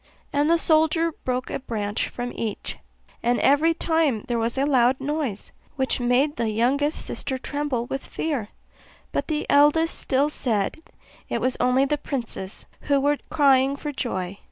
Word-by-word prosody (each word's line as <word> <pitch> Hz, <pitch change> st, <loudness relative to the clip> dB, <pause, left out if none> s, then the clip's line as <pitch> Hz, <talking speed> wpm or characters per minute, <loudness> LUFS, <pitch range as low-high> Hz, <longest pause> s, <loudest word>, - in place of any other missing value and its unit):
And 290 Hz, +2 st, +2 dB
the 335 Hz, -, +5 dB
soldier 320 Hz, +1 st, +2 dB
broke 255 Hz, -4 st, -3 dB
a -, -, -2 dB
branch 210 Hz, -5 st, -2 dB
from 245 Hz, 0 st, -5 dB
each; 220 Hz, -3 st, -4 dB, 0.4 s
and 240 Hz, +1 st, +1 dB
every 315 Hz, +4 st, +4 dB
time 320 Hz, -10 st, +1 dB
there 240 Hz, -1 st, 0 dB
was 230 Hz, +3 st, 0 dB
a 275 Hz, -, +2 dB
loud 260 Hz, -2 st, +3 dB
noise, 275 Hz, -7 st, -3 dB, 0.2 s
which 265 Hz, -2 st, 0 dB
made 250 Hz, +5 st, +2 dB
the 230 Hz, -, 0 dB
youngest 270 Hz, +8 st, +1 dB
sister 265 Hz, -, -3 dB
tremble 285 Hz, -3 st, -2 dB
with 270 Hz, +2 st, -4 dB
fear; 280 Hz, -10 st, -3 dB, 0.6 s
but -, -, -2 dB
the 305 Hz, -2 st, -1 dB
eldest 300 Hz, +3 st, +4 dB
still 280 Hz, +2 st, +1 dB
said, 220 Hz, -7 st, -1 dB, 0.5 s
it -, -, -1 dB
was 255 Hz, 0 st, +1 dB
only 250 Hz, +2 st, +3 dB
the 295 Hz, +1 st, -1 dB
princes, 235 Hz, -9 st, -5 dB, 0.2 s
who 280 Hz, -1 st, +4 dB
were 290 Hz, +1 st, +1 dB
crying 275 Hz, -3 st, +4 dB
for 295 Hz, +1 st, -5 dB
joy. 195 Hz, -8 st, -3 dB
270 Hz, 160 wpm, -24 LUFS, 240-295 Hz, 0.6 s, the